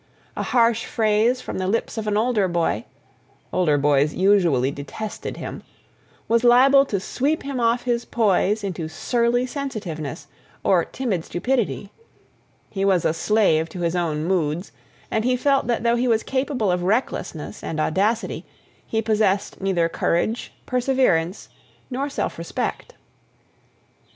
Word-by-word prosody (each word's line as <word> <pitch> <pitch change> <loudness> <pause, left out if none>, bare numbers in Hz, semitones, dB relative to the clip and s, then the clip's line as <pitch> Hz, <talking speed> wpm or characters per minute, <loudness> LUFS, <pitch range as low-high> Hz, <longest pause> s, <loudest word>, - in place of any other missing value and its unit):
a - - -2
harsh 230 -2 +2
phrase 225 +3 +1
from - - -5
the 185 - -1
lips 225 +4 -1
of 220 -2 -4
an 210 0 +1
older 220 -3 +2
boy 170 - 0 0.7
(older 155 -5 +3
boys 145 +1 +2
usually 175 -10 +3
detested 150 +10 -6
him) - - -6 0.7
was 230 +1 +2
liable 270 +3 +6
to 200 - -1
sweep 285 +10 -1
him 275 -2 -3
off 235 +1 +2
his 240 -1 0
poise 210 -1 +1
into 180 -5 -3
surly 235 +9 0
sensitiveness, 195 - -5 0.4
or 180 -3 +3
timid 215 -9 -3
stupidity... 210 +1 -2 0.8
he 195 -2 -2
was 190 -4 +2
a - - +2
slave 165 -3 +2
to 175 +2 -7
his 170 0 0
own 160 -3 -1
moods 170 -1 -1 0.4
and 220 - +1
he 250 +1 +2
felt 275 -1 +2
that 235 -2 0
though 235 0 +3
he 245 +1 +1
was 225 -2 +2
capable 260 -6 0
of 180 0 0
recklessness 185 - -2
and 155 - -4
audacity, 205 +9 0 0.4
he 225 0 -1
possessed 210 -3 0
neither 185 -3 +1
courage, 175 +7 -1
perseverance, 250 -9 +1 0.4
nor 275 +3 -2
self - - -3
respect. - - -4
210 Hz, 140 wpm, -23 LUFS, 175-240 Hz, 0.8 s, liable